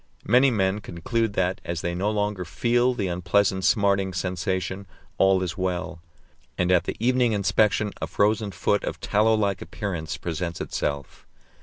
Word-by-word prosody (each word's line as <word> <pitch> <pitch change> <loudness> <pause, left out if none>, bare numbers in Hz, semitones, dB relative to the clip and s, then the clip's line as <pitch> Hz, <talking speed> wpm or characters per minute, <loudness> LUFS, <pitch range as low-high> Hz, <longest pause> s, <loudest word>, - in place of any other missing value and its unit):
Many 130 +3 +5
men 100 -3 +1
conclude 105 +6 -2
that, 95 -1 0
as 85 -1 -4
they 85 - -2
no 95 +4 0
longer 105 -3 -1
feel 120 +8 +1
the 100 -5 -1
unpleasant 95 +2 +1
smarting 100 -3 +2
sensation, 95 +1 -2 0.3
all 95 -1 +4
is 90 +2 -4
well; 90 -2 -3 0.6
and 90 0 +1
at 90 -2 +3
the - - -3
evening 125 0 +2
inspection 105 +1 +2
a 80 - -2
frozen 105 +3 +1
foot 100 +2 0
of - - -4
tallow 110 +2 +2
like 100 -3 0
appearance 85 -2 -4
presents 85 +1 -4
itself. 70 -1 -4
95 Hz, 155 wpm, -25 LUFS, 90-105 Hz, 0.6 s, Many